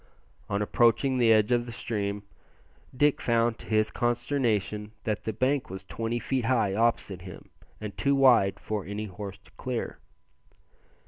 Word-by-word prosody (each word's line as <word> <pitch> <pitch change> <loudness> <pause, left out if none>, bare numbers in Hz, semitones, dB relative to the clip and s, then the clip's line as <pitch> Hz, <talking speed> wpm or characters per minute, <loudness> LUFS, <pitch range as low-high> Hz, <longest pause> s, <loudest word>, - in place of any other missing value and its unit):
On 100 +1 0
approaching 120 +4 +3
the 115 -2 +5
edge 110 +1 +4
of 120 0 +2
the - - -6
stream, 105 -3 -3 0.7
Dick 145 +1 +3
found 115 -1 +1
to - - -12
his 110 -1 +2
consternation 115 -4 -1
that 105 -2 -2
the 110 - 0
bank 130 +5 0
was 95 +1 -7
twenty 115 +4 -3
feet 130 0 -1
high 115 -6 +2
opposite 105 -4 0
him, 90 -1 -11 0.3
and 105 -2 -6
too 140 0 +2
wide 125 -8 +5
for 105 -2 -3
any 105 +3 -4
horse 100 0 -7
to 100 - -23
clear. 125 -3 -4
115 Hz, 155 wpm, -28 LUFS, 105-120 Hz, 0.7 s, the